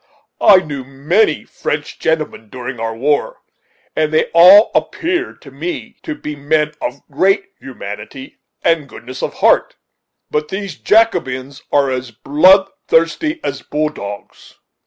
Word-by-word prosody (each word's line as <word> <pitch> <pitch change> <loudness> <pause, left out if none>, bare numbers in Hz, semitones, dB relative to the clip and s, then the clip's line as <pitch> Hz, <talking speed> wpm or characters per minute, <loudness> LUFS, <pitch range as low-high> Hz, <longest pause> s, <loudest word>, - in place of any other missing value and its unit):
I 200 - +8
knew 145 -6 -6
many 150 +8 +1
French 145 0 -5
gentlemen 155 -9 -2
during 125 0 -7
our 115 0 -3
war, 145 +5 0 0.6
and 155 -1 +1
they 155 - +1
all 185 +6 +8
appeared 350 +1 -2
to 140 - -13
me 160 +6 -6
to 310 - -5
be 150 - -6
men 150 +1 0
of 140 - -4
great 195 - +1
humanity 110 +1 -9 0.2
and 165 -4 +1
goodness 130 +2 -9
of - - -3
heart; - - +2 0.6
but 150 0 -1
these 195 0 -5
Jacobins 140 - +1
are 140 -2 +2
as 130 -1 -3
blood 170 - +4 0.2
thirsty 300 - +1
as 140 -1 -3
bull 150 +1 -1
dogs." 100 -8 -9
150 Hz, 135 wpm, -17 LUFS, 130-180 Hz, 0.6 s, I